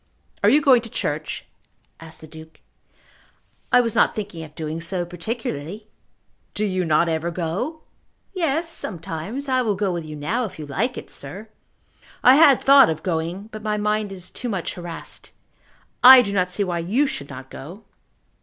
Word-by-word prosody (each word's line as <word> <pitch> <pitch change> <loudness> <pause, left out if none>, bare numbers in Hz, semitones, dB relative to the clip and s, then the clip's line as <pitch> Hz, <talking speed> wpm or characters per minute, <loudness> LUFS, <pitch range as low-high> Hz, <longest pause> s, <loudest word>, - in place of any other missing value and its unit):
"Are - - +6
you 295 - +5
going 255 -4 +6
to 225 - -10
church?" 150 -5 -3 0.5
asked 160 -1 -9
the 160 - -11
Duke. 160 +1 -13 1.1
"I 250 - +6
was 230 -3 -2
not - - +3
thinking 200 -6 -5
of 155 -1 -12
doing 160 +1 -4
so 175 +1 -2
particularly." 175 - -5 0.7
"Do 215 - 0
you 185 -3 -1
not 160 +1 +3
ever 165 +1 -1
go?" 185 - -3 0.5
"Yes; 330 -3 0
sometimes. 210 - -5
I 255 -1 +2
will 215 -4 0
go 195 -1 0
with 170 -2 -3
you 155 -1 -8
now, 195 +12 -1
if 205 - -9
you 155 - -6
like 220 - -2
it, - - -8
sir." 195 +11 -8 0.7
"I 255 - +8
had 280 -2 +6
thought 275 -4 +7
of 160 -1 -3
going, 175 +4 -3
but 215 - -8
my 210 -1 -1
mind 210 0 -1
is 185 -2 -10
too 245 - -5
much 190 -6 -3
harassed. 175 -2 -8 0.7
I 255 0 +11
do 200 -3 -4
not 180 -2 +1
see 200 +3 0
why 175 -3 -2
you 210 +13 +1
should 140 - -5
not 130 -1 -10
go." 175 +10 -10
190 Hz, 180 wpm, -22 LUFS, 160-230 Hz, 1.1 s, I